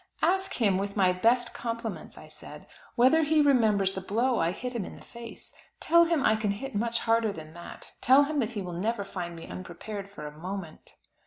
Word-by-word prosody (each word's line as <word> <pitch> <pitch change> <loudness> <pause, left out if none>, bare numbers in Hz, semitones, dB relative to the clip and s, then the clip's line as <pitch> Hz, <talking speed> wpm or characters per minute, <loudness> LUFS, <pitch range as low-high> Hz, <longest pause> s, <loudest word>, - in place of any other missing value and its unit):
"Ask 380 +1 +1
him, 200 -6 +2
with 200 +1 -4
my 185 -2 +4
best 235 +6 +2
compliments," 230 -7 -5
I 155 - -11
said, 150 -1 -12 0.3
"whether 260 +7 +5
he 310 0 +2
remembers 220 -9 +3
the 190 - -4
blow 235 +6 +1
I 165 - +2
hit 250 +8 -5
him 235 -4 -2
in - - -8
the - - -14
face. 235 -1 -10 0.3
Tell 340 0 +5
him 330 -5 +1
I 220 - +5
can 215 -1 -1
hit 240 +7 -4
much 230 +2 0
harder 225 -1 +2
than 160 -4 -10
that; 170 +1 -11
tell 265 +3 +6
him 295 +1 -1
that 225 -5 0
he 200 - -2
will 180 -1 -6
never 205 +4 -1
find 175 -3 -6
me 165 - -9
unprepared, 195 +3 -7
for 175 -7 -9
a 150 0 -8
moment." 180 0 -7
215 Hz, 215 wpm, -28 LUFS, 185-245 Hz, 0.3 s, tell